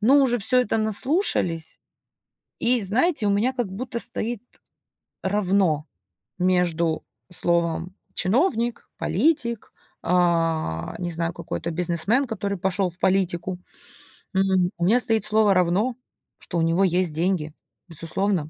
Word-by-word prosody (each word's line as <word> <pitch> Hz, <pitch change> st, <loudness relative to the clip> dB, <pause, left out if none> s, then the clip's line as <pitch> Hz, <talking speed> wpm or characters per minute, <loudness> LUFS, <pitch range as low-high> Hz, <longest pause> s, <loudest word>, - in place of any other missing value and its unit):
Ну 265 Hz, +7 st, +5 dB
уже 245 Hz, -2 st, +2 dB
всё 250 Hz, +4 st, +3 dB
это 225 Hz, -2 st, 0 dB
наслушались. 215 Hz, -, 0 dB, 0.8 s
И, 240 Hz, -1 st, +2 dB
знаете, 230 Hz, -, +2 dB
у 205 Hz, -, +3 dB
меня 220 Hz, +6 st, +2 dB
как 245 Hz, -6 st, -3 dB
будто 235 Hz, +4 st, -4 dB
стоит 235 Hz, -1 st, -1 dB, 0.8 s
равно 190 Hz, -6 st, +1 dB, 0.5 s
между 170 Hz, -3 st, +1 dB, 0.3 s
словом 170 Hz, +1 st, 0 dB, 0.2 s
"чиновник", 240 Hz, -, 0 dB
"политик", 235 Hz, -8 st, 0 dB, 0.3 s
а, 165 Hz, -, 0 dB
не 175 Hz, -1 st, -4 dB
знаю, 165 Hz, +1 st, -2 dB
какой-то 170 Hz, 0 st, -5 dB
"бизнесмен", 175 Hz, -, 0 dB
который 200 Hz, -4 st, -3 dB
пошёл 190 Hz, +1 st, 0 dB
в 175 Hz, -, -14 dB
политику. 185 Hz, -1 st, 0 dB, 0.8 s
М. 190 Hz, -1 st, +2 dB
У 170 Hz, -, 0 dB
меня 230 Hz, +7 st, +4 dB
стоит 225 Hz, -1 st, +3 dB
слово 215 Hz, -1 st, +4 dB
"равно", 185 Hz, +7 st, +1 dB, 0.4 s
что -, -, -5 dB
у -, -, +2 dB
него 165 Hz, +4 st, +2 dB
есть 180 Hz, -2 st, +1 dB
деньги. 165 Hz, -2 st, -1 dB, 0.3 s
Безусловно. 165 Hz, 0 st, -2 dB
190 Hz, 125 wpm, -24 LUFS, 170-225 Hz, 0.8 s, Ну